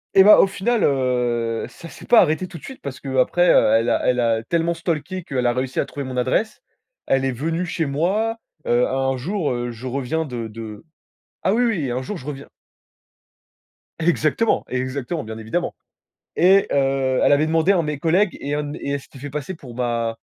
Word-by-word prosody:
Et 190 - +9
bah 210 - +9
au - - +7
final, 220 +4 0
heu, 125 -4 0
ça 165 - -12
c'est - - -13
pas 240 - +7
arrêté 160 +4 +1
tout 165 - -10
de - - -23
suite 265 - -10
parce 140 -1 -6
qu'après 135 +6 +1
elle 115 -5 +4
a - - +1
elle 125 0 +2
a 115 -1 +1
tellement 170 +3 0
stalké 170 +2 -3
qu'elle 125 -4 -1
a 120 - +2
réussi 130 +1 -2
à - - +1
trouver 140 - -6
mon 130 -1 -5
adresse. 130 - 0 0.5
Elle 135 0 +2
est 135 - +1
venue 165 +8 -2
chez 165 -3 -2
moi, 200 +11 0 0.3
heu, 120 +1 +3
un 135 0 0
jour, 170 +2 -2
heu, 120 0 -2
je 120 +3 -8
reviens 140 +5 -2
de 120 -4 -5
de 110 +4 -9 0.6
ah 190 - +2
oui, 245 +2 +2
oui, 170 - 0
un 125 +2 -1
jour 200 +9 -5
je 130 - -9
reviens 140 -1 -7 1.5
Exactement, 165 +6 +1
exactement, 130 +5 -3
bien 110 0 -7
évidemment. 115 +11 -3 0.6
Et 190 +3 +5
heu, 135 -2 +1
elle - - +4
avait 145 +2 +4
demandé 165 +4 +3
à 190 - +3
un - - +2
de - - -5
mes 150 -2 -3
collègues 180 +5 +2
et 145 +1 -3
un 150 - -1
dem 145 +1 -5
et 140 - -3
elle 140 - -1
s'était 135 - -15
fait 145 +1 -6
passer 150 +6 -5
pour 125 -7 -12
ma 115 -2 -1
140 Hz, 210 wpm, -22 LUFS, 125-170 Hz, 1.5 s, Et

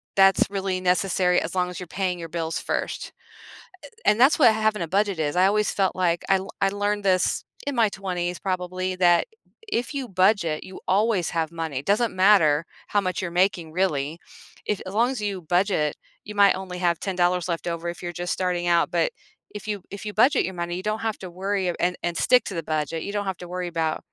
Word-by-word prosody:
that's 195 -1 +5
really 195 -2 -2
necessary 180 0 +2
as - - -5
long 180 -1 +1
as 180 - -7
you're 180 - -7
paying 180 -2 0
your 165 -1 -7
bills 165 -1 -2
first. - - -3 0.7
Eh - - -11 0.2
and 210 - +4
that's 270 +5 +5
what 240 -6 +7
having 215 -2 0
a 170 - -2
budget 200 -4 +1
is- 150 0 -1
I 185 +1 +5
always 210 +1 +2
felt 195 -2 0
like 175 -2 +1
I 195 - +6
l 190 +1 -6
I 195 - +4
learned 205 +1 -1
this, 185 -1 +2 0.2
in 285 - -1
my 230 -3 +3
20s 180 -3 -3
probably, 185 0 -2
that 175 -1 +4 0.4
if 245 - -2
you 275 -3 -3
budget, 185 -5 +2
you 185 - -10
always 200 -2 +2
have 165 -2 -1
money- 140 -5 -3
doesn't 220 0 +1
matter 165 -7 +5 0.3
how 205 - +4
much 185 -3 -2
you're 180 -2 -4
making 175 -5 -2
really, 160 -4 0 0.5
if 210 - -1
as 185 - -6
long 235 +4 +3
as 255 -5 -4
you 200 -3 -3
budget, 175 -3 +1 0.3
you 210 - -9
might 200 -1 +5
only 185 -1 -6
have 175 -2 +1
$10 180 -2 0
left 170 0 -3
over, 170 0 -3
if 170 - -7
you're 175 -1 -4
just 175 - -2
starting 180 -1 -1
out, 170 -1 +3
but, - - +1 0.5
if 205 - -13
you 205 -2 -3
if 200 +2 -7
you 210 - -4
budget 250 +7 +4
your 190 - -5
money, 175 +1 -3
you 185 - -6
don't 215 +1 -2
have 220 - -2
to 185 - -7
worry- 195 +3 -2 0.2
and 180 0 -1
and 170 - -3
stick 250 -2 +4
to - - -5
the 165 - -3
budget- 155 +1 -2
you 200 - -4
don't 205 0 -2
have 190 - -3
to 175 - -9
worry 180 -1 -2
about 165 -2 -1
185 Hz, 225 wpm, -24 LUFS, 175-205 Hz, 0.7 s, what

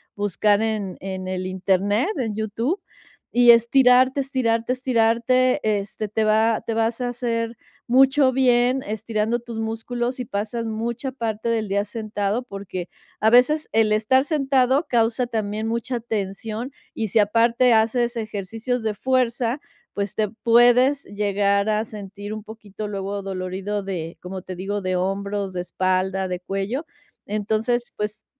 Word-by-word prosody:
buscar 205 +1 +2
en 215 -4 -2
en 190 -1 -5
el 185 0 -3
Internet, 195 - +1
en 225 -5 -2
YouTube, 230 - -2 0.5
y 240 0 +7
estirarte, 250 +3 +5
estirarte, 250 -3 0
estirarte, 255 +1 +2
este, 210 0 -1
te 220 +1 0
va 220 +1 +3
te 230 - -2
vas 225 +2 0
a 245 - -1
hacer 230 -1 -2 0.3
mucho 265 +2 +5
bien 250 0 +3
estirando 220 +2 -1
tus 235 -1 -7
músculos, 240 +3 -3
si 250 - -4
pasas 220 +2 -3
mucha 235 +4 -3
parte 230 -3 -3
del 225 -2 0
día 200 +1 +1
sentado 210 +1 -2
porque, 195 -5 -6 0.3
a 220 - +4
veces, 255 +6 +4
el 220 -1 +3
estar 220 +5 +3
sentado 275 -1 +2
causa 235 +1 +1
también 215 -1 -2
mucha 235 +2 -2
tensión, 220 +3 -4 0.2
y 220 -1 -2
si 220 - +3
aparte 230 +4 +4
haces 235 +2 +2
ejercicios 225 +3 -3
de 220 -1 0
fuerza, 250 +1 0 0.3
pues, 200 -1 -3
te 215 -2 0
puedes 245 +4 +5
llegar 200 0 +1
a 215 0 +1
sentir, 205 -1 -8
un 215 -1 -6
poquito, 215 -1 -8
luego, 200 0 -4
adolorido 195 +1 -4
de, 170 -4 -5
como 185 +1 -6
te 185 0 -7
digo, 195 +3 -3
de 185 -1 -1
hombros, 200 +1 -2
de 180 - -3
espalda, 185 +1 0
de 180 -1 -3
cuello. 195 - -3 0.4
Entonces, 220 +4 -1
pues, 210 0 -4
220 Hz, 145 wpm, -23 LUFS, 200-240 Hz, 0.5 s, y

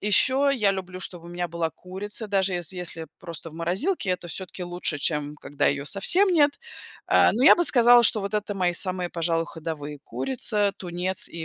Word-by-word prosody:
еще 260 +7 +3
я 210 -6 +2
люблю, 185 -1 -7
чтобы 175 -2 -5
у - - -10
меня 175 0 -4
была 165 -1 -3
курица, 205 +6 -5
даже 195 -1 0
если 175 +1 -3
если 165 -2 -5
просто 165 -1 -9
в - - -15
морозилке, 185 - -2
это 180 -1 -3
всё 190 +3 -5
таки 180 - -9
лучше, 175 -3 -2
чем 150 0 -2
когда 145 -1 -2
ее 140 0 0
совсем 350 - +5
нет. 295 -5 +3 0.6
Э, - - +5
но 235 - -1
я - - +8
бы 345 - +2
сказала, 240 -4 +6
что 215 -1 +4
вот 200 +2 -5
это 210 -1 -2
мои 180 -2 0
самые, 180 0 -1
пожалуй, 165 -1 -1
ходовые: 150 -3 -7
курица, 210 -6 -1
тунец, 180 +1 -3
и 165 -1 -7
185 Hz, 200 wpm, -24 LUFS, 170-210 Hz, 0.6 s, я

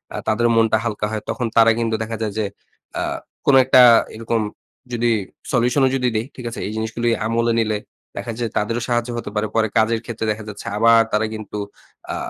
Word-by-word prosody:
আ - - -3
তাদের 120 +2 +2
মনটা 115 -1 +4
হালকা 105 -2 -2
হয়। 110 -1 -3
তখন 125 - -2
তারা 115 0 +7
কিন্তু 115 -1 0
দেখা 115 +1 -5
যায় 105 -2 -2
যে 110 - 0 0.5
আ - - 0 0.4
কোনো 135 - +6
একটা 130 -1 +6 0.3
এরকম 115 0 -1 0.5
যদি 120 0 +1 0.4
সলিউশন 125 +2 +2
ও - - +5
যদি 125 -1 +1
দেই 110 +1 0
ঠিক 125 - -9
আছে? 115 - -7
এই - - -4
জিনিসগুলি 110 +2 -1 0.2
আমলে 115 +1 +1
নিলে 110 -2 0 0.4
দেখা 120 - -4
যায় 115 -3 -2
তাদেরও 115 +3 -1
সাহায্য 120 0 0
হতে 115 - -5
পারে। 105 +1 0
পরে 110 -1 +3
কাজের 110 +1 +3
ক্ষেত্রে 115 -1 -4
দেখা 105 0 -5
যাচ্ছে 105 - -9
আবার 115 +1 +6
তারা 105 +1 +1
কিন্তু 110 -1 -7 0.6
আ - - -3
115 Hz, 200 wpm, -21 LUFS, 110-120 Hz, 0.6 s, তারা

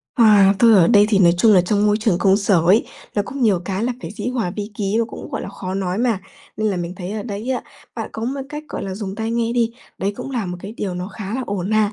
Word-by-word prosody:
À, 210 -5 +6
tôi 230 +1 +6
ở 180 -5 +6
đây 205 -3 +6
thì 210 -3 +3
nói 175 -3 +6
chung 220 +3 +6
là 190 - +7
trong 205 +3 +1
môi 210 0 +3
trường 215 -6 +2
công 195 0 +4
sở 200 -3 +3
ấy, 200 +6 +5 0.3
là 205 - +1
cũng 270 +6 -5
nhiều 205 -6 +3
cái 195 +3 -2
là 250 - 0
phải 165 - -6
dĩ 210 +3 -4
hòa 240 -8 -1
vi 210 0 -4
ký 200 0 -1
và 230 - +2
cũng, - - -9
gọi - - -3
là, - - -6
khó 190 -2 -6
nói 190 0 -2
mà, 230 -5 +1 0.4
nên 215 0 0
là 195 - -2
mình 175 0 -4
thấy 185 +1 -5
ở 215 -1 -4
đấy 210 +3 -5
á, 255 - -1 0.3
bạn - - -4
có 220 - -4
một 270 +3 -3
cách, 300 +1 -6
gọi - - -5
là, 190 -1 -4
dùng 195 -1 -5
tai 220 +1 -3
nghe 230 0 0
đi, 235 -1 +1 0.3
đấy 200 +1 -1
cũng - - -6
là 240 -7 -2
một 180 0 -4
cái 200 +3 -7
điều 190 -3 -3
nó 180 +1 -4
khá 205 +1 -6
là 260 - -2
ổn 195 -1 -3
mà. 215 -1 +2
205 Hz, 295 wpm, -20 LUFS, 190-225 Hz, 0.4 s, là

